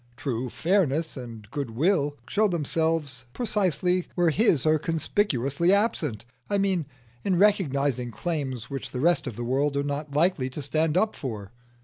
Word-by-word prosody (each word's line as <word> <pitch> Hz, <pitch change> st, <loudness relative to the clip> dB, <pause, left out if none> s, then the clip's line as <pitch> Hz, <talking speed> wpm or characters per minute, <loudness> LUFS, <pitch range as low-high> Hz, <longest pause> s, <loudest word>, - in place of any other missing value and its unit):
True 125 Hz, -2 st, -2 dB
fairness 165 Hz, -, +1 dB
and 115 Hz, -5 st, -8 dB
goodwill 145 Hz, -, 0 dB
show 215 Hz, +1 st, +2 dB
themselves 160 Hz, -, -1 dB
precisely 185 Hz, -, 0 dB
where 175 Hz, -2 st, +3 dB
his 165 Hz, -, +3 dB
are 155 Hz, 0 st, +4 dB
conspicuously 165 Hz, -, +1 dB
absent. 185 Hz, -, +1 dB, 0.2 s
I 205 Hz, -, +1 dB
mean, 190 Hz, -6 st, +1 dB, 0.4 s
in 190 Hz, -, +1 dB
recognising 140 Hz, -, +2 dB
claims 130 Hz, -3 st, -3 dB
which 135 Hz, -1 st, -5 dB
the 125 Hz, -, -5 dB
rest 170 Hz, +2 st, +2 dB
of 115 Hz, -, -5 dB
the 120 Hz, -, -4 dB
world 140 Hz, +4 st, 0 dB
are 140 Hz, -, +1 dB
not 145 Hz, 0 st, -4 dB
likely 155 Hz, -4 st, +2 dB
to 140 Hz, +3 st, -6 dB
stand 155 Hz, +2 st, +1 dB
up 215 Hz, +3 st, +2 dB
for. 105 Hz, -7 st, -6 dB
150 Hz, 150 wpm, -26 LUFS, 130-180 Hz, 0.4 s, are